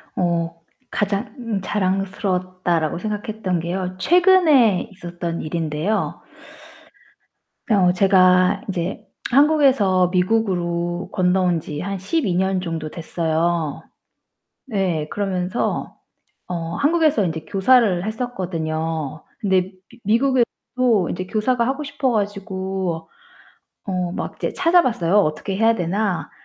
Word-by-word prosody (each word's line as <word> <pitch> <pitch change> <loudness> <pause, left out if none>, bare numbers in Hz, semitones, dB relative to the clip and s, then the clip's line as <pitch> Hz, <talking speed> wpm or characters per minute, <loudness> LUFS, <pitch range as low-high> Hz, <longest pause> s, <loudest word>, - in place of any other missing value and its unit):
어 170 -2 0 0.4
'가장 210 +1 -2
자랑스러웠다.'라고 185 -4 -1
생각했던 210 -3 -3
게요, 180 +2 -3
최근에 315 - +4
있었던 175 -2 -5
일인데요 160 +5 -2 1.5
어 190 -5 +4
제가 185 0 +4
이제 180 0 -4 0.2
한국에서 265 - +4
미국으로 180 -3 0
건너온 180 -2 +2
지 150 -1 -6
한 195 +1 -4
12 205 - -1
년 190 0 +1
정도 165 -3 -4
됐어요. 165 -1 -1 0.8
네, 185 - -1
그러면서 190 0 -2 0.5
어 170 -1 -4
한국에서 305 - +2
인제 160 -2 -3
교사를 195 -1 +3
했었거든요. 165 - -3
근데 190 -3 +1 0.2
미 240 - -18
미국에서도 240 -3 +1
이제 185 +1 -4
교사가 235 +4 0
하고 270 +3 -2
싶어 285 -2 -1
가지고 190 -5 -3 0.8
어 180 -3 -2
막 - - -5
이제 - - -3
찾아봤어요, 260 - +2
어떻게 190 +2 0
해야 225 +1 +4
되나. 195 0 -1
190 Hz, 245 characters per minute, -21 LUFS, 175-220 Hz, 1.5 s, 최근에